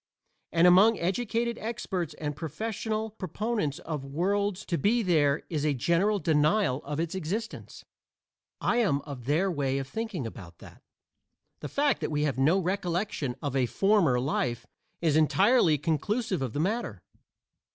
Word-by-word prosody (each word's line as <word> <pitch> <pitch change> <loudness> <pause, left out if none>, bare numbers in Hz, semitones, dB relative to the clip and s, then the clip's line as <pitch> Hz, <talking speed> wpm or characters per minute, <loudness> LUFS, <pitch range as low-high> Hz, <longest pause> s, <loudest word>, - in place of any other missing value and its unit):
And 170 +1 +4
among 195 +6 +6
educated 230 +5 -1
experts 190 -8 -4
and 150 -2 -4
professional 215 - -3
proponents 205 - -2
of 155 -4 -5
worlds 195 +7 -1
to 170 - -1
be 230 +3 +2
there 150 -6 +2
is 155 -4 -2
a 150 -2 +1
general 170 - +2
denial 155 -3 +2
of 145 +2 -4
its 165 0 -2
existence. 190 +6 -5 0.7
I 235 - +1
am 195 -12 +2
of 135 -5 -9
their 165 +8 +1
way 135 -4 -1
of 135 -1 -3
thinking 220 - -4
about 90 -7 -9
that. - - -14 0.8
The 145 - -6
fact 285 0 +1
that - - -1
we 150 -1 0
have 140 -3 -1
no 155 +8 +4
recollection 180 - -2
of 140 -2 -2
a 130 -2 +2
former 170 - +3
life 125 -3 -1 0.4
is 160 -3 +2
entirely 170 - +4
conclusive 180 - -1
of 130 -4 -3
the - - -2
matter. 190 - -2
170 Hz, 150 wpm, -28 LUFS, 145-210 Hz, 0.8 s, among